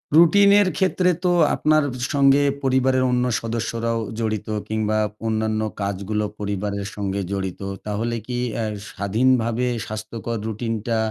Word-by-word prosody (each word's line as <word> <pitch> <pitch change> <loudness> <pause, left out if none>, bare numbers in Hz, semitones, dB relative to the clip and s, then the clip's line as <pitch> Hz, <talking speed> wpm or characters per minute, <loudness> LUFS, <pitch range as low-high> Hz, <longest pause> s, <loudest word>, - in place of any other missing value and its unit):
রুটিনের 200 +4 +6
ক্ষেত্রে 185 -1 +2 0.2
তো - - +4 0.3
আপনার 155 0 +3 0.2
স - - +2
সঙ্গে 140 0 +5 0.2
পরিবারের 130 0 +2
অন্য 125 0 +2 0.2
সদস্যরাও 115 0 -2 0.2
জড়িত 110 -2 -2 0.2
কিংবা 110 0 0 0.3
অন্যান্য 110 0 0 0.2
কাজগুলো 100 +2 -2
পরিবারের 100 0 -3
সঙ্গে 100 -1 -2
জড়িত। 95 -1 -3 0.2
তাহলে 110 +3 -2
কি 125 -1 -3 0.2
অ্যা 115 - -1 0.3
স্বাধীনভাবে 115 +4 +1 0.2
স্বাস্থ্যকর 110 +2 -5
রুটিনটা 115 +1 -2
115 Hz, 120 wpm, -22 LUFS, 105-130 Hz, 0.3 s, রুটিনের